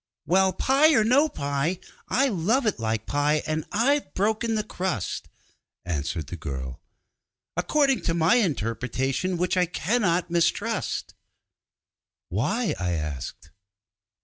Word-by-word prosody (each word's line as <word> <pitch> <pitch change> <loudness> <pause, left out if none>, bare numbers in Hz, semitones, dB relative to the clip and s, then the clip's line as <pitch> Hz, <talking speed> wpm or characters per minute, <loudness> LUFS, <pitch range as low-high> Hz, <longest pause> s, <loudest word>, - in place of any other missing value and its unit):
'Well, 190 +4 +4
pie 280 - +4
or 220 - +5
no 275 +8 +4
pie, 145 - -1 0.3
I 275 +2 +2
love 225 +5 +1
it 215 - 0
like 110 -1 -1
pie, 145 +1 +1
and 155 0 -2
I've 275 +7 +1
broken 220 +3 +1
the 215 - 0
crust,' 180 - -3 0.6
answered 80 -1 -2
the - - -7
girl, 65 -2 -6 0.7
'according 270 - +2
to 165 - +1
my 170 +6 +4
interpretation, 135 - -1
which 180 +2 0
I 180 -1 +3
cannot 180 -2 0
mistrust.' 170 -1 0 1.2
'Why?' 205 - 0
I 90 -1 -1
asked. 75 -1 -5
175 Hz, 120 wpm, -25 LUFS, -, 1.2 s, or